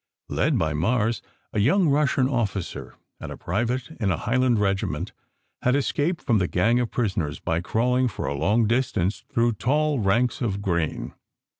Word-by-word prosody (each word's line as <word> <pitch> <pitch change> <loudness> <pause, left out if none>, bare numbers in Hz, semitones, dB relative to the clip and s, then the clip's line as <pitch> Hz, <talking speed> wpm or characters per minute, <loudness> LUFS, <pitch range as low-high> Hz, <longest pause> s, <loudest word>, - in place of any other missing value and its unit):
Led - - +1
by 80 -2 0
Mars, 110 +8 +1 0.3
a - - 0
young 165 - +3
Russian 140 -2 +2
officer 105 -8 -3 0.2
and - - -7
a - - -7
private 120 - -2
in 105 -4 +1
a 90 - +1
Highland 125 +1 +1
regiment 100 -2 -1 0.5
had 125 +1 +2
escaped 145 +4 0
from 115 -4 +2
the 90 - +1
gang 115 +8 +2
of 120 -2 -1
prisoners 95 -11 -2
by 80 +1 -1
crawling 125 +6 +1
for 110 - -4
a - - -1
long 105 +11 +2
distance 110 -5 0
through 120 -3 +2
tall 145 +6 +1
ranks 115 +5 +1
of 100 -5 -1
grain. 85 -5 -2
115 Hz, 165 wpm, -24 LUFS, 95-125 Hz, 0.5 s, young